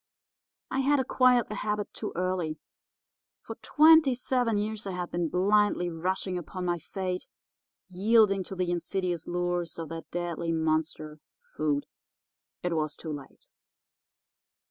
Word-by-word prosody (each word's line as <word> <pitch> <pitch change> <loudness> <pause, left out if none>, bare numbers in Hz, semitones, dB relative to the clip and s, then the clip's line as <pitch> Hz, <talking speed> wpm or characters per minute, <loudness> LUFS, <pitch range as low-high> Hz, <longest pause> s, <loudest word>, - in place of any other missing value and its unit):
I 265 - 0
had 280 +1 +3
acquired 255 -2 +4
the - - -6
habit 210 -1 -2
too 215 - -5
early. 180 -3 -1 0.8
For - - -8
twenty 310 -3 +6
seven 245 -3 0
years 210 0 -3
I 195 - -3
had 180 -1 -4
been 170 -2 -1
blindly 195 -1 +2
rushing 180 +2 -2
upon 180 +2 -6
my 175 -1 0
fate, 185 +2 -4 0.6
yielding 195 +1 +3
to 190 - -7
the 180 -1 -1
insidious 175 -1 -2
lures 175 -1 -1
of 165 -2 -5
that 165 0 -7
deadly 170 -1 -2
monster, 155 -1 -1 0.2
food. 145 -2 -2 0.8
It 175 -1 0
was 155 -1 -1
too 160 -2 -6
late. 140 -2 -11
180 Hz, 135 wpm, -28 LUFS, 165-210 Hz, 0.8 s, twenty